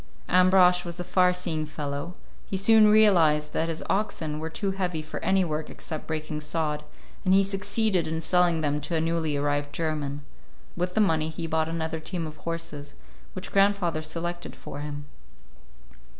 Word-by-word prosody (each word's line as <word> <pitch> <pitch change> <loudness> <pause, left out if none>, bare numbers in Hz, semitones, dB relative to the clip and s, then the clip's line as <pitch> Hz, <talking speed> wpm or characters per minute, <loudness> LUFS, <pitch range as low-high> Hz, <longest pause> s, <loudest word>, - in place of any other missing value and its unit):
Ambrosch 180 0 +5
was 175 0 -6
a - - -2
far 180 0 +3
seeing 175 -3 -2
fellow; 150 +2 -5 0.3
he 195 - -2
soon 215 +2 +6
realized 170 -9 +4
that 165 - 0
his 160 - -4
oxen 180 -7 -1
were 160 +1 -4
too 195 +4 -2
heavy 180 -5 -2
for 155 - -6
any 190 -1 +3
work 155 -1 -3
except 155 -2 -6
breaking 155 -1 -3
sod, 150 -1 -1 0.4
and 185 0 +4
he 195 - +5
succeeded 195 -1 0
in 160 0 -2
selling 175 -1 +2
them 150 -1 0
to 165 +4 -3
a - - +2
newly 160 -2 0
arrived 145 0 -1
German. 145 -2 -3 0.5
With 180 +1 -2
the 215 - +4
money 160 -5 +2
he 165 +1 -5
bought 160 0 0
another 160 -1 -3
team 165 +1 -4
of 155 0 -8
horses, 165 -3 -6 0.4
which 185 - -6
grandfather 195 -5 +2
selected 175 +2 -5
for 140 - -8
him. 145 0 -6
165 Hz, 170 wpm, -26 LUFS, 155-180 Hz, 0.5 s, soon